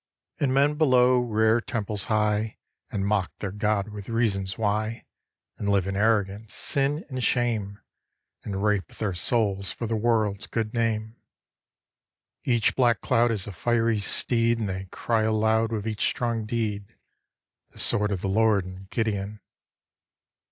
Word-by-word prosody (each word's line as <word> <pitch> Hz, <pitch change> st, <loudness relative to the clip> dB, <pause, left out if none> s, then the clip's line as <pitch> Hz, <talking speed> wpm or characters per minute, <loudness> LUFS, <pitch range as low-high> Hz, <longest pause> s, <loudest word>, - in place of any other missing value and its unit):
And 140 Hz, -3 st, +1 dB
men 145 Hz, +3 st, +2 dB
below 125 Hz, -4 st, +5 dB
rear 110 Hz, -1 st, +2 dB
temples 105 Hz, -3 st, -2 dB
high 110 Hz, -1 st, 0 dB, 0.3 s
And 100 Hz, -1 st, -2 dB
mock 100 Hz, -3 st, 0 dB
their 100 Hz, -, -4 dB
God 105 Hz, 0 st, 0 dB
with 105 Hz, -1 st, -9 dB
reasons 100 Hz, -5 st, 0 dB
why, 110 Hz, +2 st, -1 dB, 0.5 s
And 100 Hz, -, -2 dB
live, 100 Hz, -2 st, +2 dB
in 95 Hz, 0 st, -3 dB
arrogance, 105 Hz, 0 st, 0 dB
sin 140 Hz, +3 st, 0 dB
and 130 Hz, -3 st, -4 dB
shame, 110 Hz, -6 st, 0 dB, 0.6 s
And 100 Hz, -1 st, -4 dB
rape 105 Hz, -5 st, +1 dB
their 105 Hz, -4 st, -2 dB
souls 100 Hz, +1 st, +2 dB
for 120 Hz, -, -5 dB
the 115 Hz, 0 st, -1 dB
world's 110 Hz, -3 st, 0 dB
good 110 Hz, -2 st, -3 dB
name. 115 Hz, -1 st, -1 dB, 1.3 s
Each 120 Hz, -4 st, +2 dB
black 120 Hz, -5 st, +3 dB
cloud 120 Hz, -1 st, +2 dB
Is 105 Hz, -4 st, -1 dB
a 105 Hz, -, -6 dB
fiery 115 Hz, +3 st, +1 dB
steed. 115 Hz, +3 st, +2 dB
And 110 Hz, -2 st, -2 dB
they 95 Hz, +1 st, -5 dB
cry 115 Hz, -2 st, 0 dB
aloud 110 Hz, +1 st, +2 dB
With 110 Hz, -1 st, -3 dB
each 110 Hz, -1 st, -2 dB
strong 115 Hz, -3 st, -1 dB
deed, 105 Hz, -2 st, -3 dB, 0.7 s
"The -, -, -21 dB
sword 105 Hz, 0 st, +3 dB
of 95 Hz, -3 st, -2 dB
the -, -, -2 dB
Lord 105 Hz, -1 st, +2 dB
and 95 Hz, +1 st, -10 dB
Gideon." 105 Hz, -2 st, -2 dB
110 Hz, 150 wpm, -26 LUFS, 100-115 Hz, 1.3 s, below